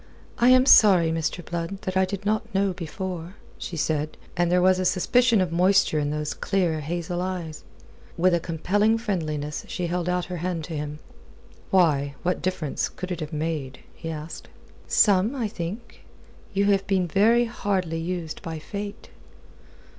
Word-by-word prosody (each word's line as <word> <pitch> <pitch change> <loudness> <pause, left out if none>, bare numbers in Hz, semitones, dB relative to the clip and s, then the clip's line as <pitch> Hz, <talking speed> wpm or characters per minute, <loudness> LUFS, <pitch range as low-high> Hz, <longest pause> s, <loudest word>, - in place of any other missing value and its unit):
"I 240 +1 +5
am 255 0 +6
sorry, 185 -10 +7
Mr. 165 +1 -2
Blood, 170 +3 -4
that 185 - -3
I 190 0 +4
did 200 +1 -6
not 215 +1 -1
know 195 -1 +2
before," 175 +1 -6 0.2
she 170 - -5
said, 155 0 -1 0.2
and 175 -1 +1
there 180 - +4
was 185 +1 +4
a - - 0
suspicion 235 +5 +3
of 180 -3 -1
moisture 180 -2 +3
in 145 -1 -1
those 150 0 -2
clear 175 -5 0
hazel 175 +3 -3
eyes. 180 -4 -4 0.5
With 180 +1 +3
a 170 - +3
compelling 205 +7 +1
friendliness 155 -9 -3
she 180 - -3
held 175 0 -2
out 180 -1 0
her 180 0 -5
hand 170 -1 -3
to 165 - -7
him. 150 0 -4 0.7
"Why, 145 -7 +2
what 180 +1 0
difference 180 -6 -2
could 185 0 -7
it 175 - -3
have 155 -1 -5
made?" 150 -4 -3
he 165 - -7
asked. 155 0 -7 0.4
"Some, 205 +4 +3
I 240 -5 -1
think. 205 +5 -7 0.5
You 200 0 +1
have 195 -1 +1
been 190 -2 +2
very 225 +7 +4
hardly 190 -7 -2
used 170 -1 -4
by 165 -1 -5
Fate." 200 +6 -7
180 Hz, 170 wpm, -25 LUFS, 160-195 Hz, 0.7 s, sorry